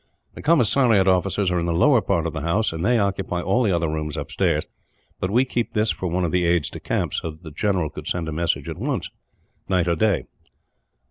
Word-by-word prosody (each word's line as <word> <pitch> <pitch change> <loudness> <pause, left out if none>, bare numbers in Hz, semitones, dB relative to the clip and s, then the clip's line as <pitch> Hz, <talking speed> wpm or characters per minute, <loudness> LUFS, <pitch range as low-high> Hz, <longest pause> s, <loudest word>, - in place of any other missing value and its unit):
The - - -9
commissariat 125 - +4
offices 95 +1 +2
are 90 - +1
in 85 - -1
the 85 - 0
lower 120 - +4
part 85 -6 0
of 85 - -3
the 80 - -4
house, 90 +6 0
and 80 +1 -4
they 120 +4 +3
occupy 95 -3 -1
all 110 +7 +2
the 110 -5 +2
other 85 -2 +1
rooms 75 -1 -3
upstairs; - - 0 0.6
but 95 - -1
we 120 +6 +3
kept 120 -2 -3
this 110 +1 +2
for 95 - -4
one 90 +1 0
of 80 - -2
the 90 -1 +1
aides 85 -4 +1
de - - -7
camp, - - -2
so 80 - -2
that 80 +2 -12
the 80 - -9
general 90 -2 0
could - - -8
send 85 -2 -2
a - - -3
message 85 +2 -1
at - - -6
once, - - -2 0.6
night 90 -2 +2
or 85 - +2
day." 100 -1 +1
90 Hz, 230 wpm, -23 LUFS, 85-105 Hz, 0.6 s, commissariat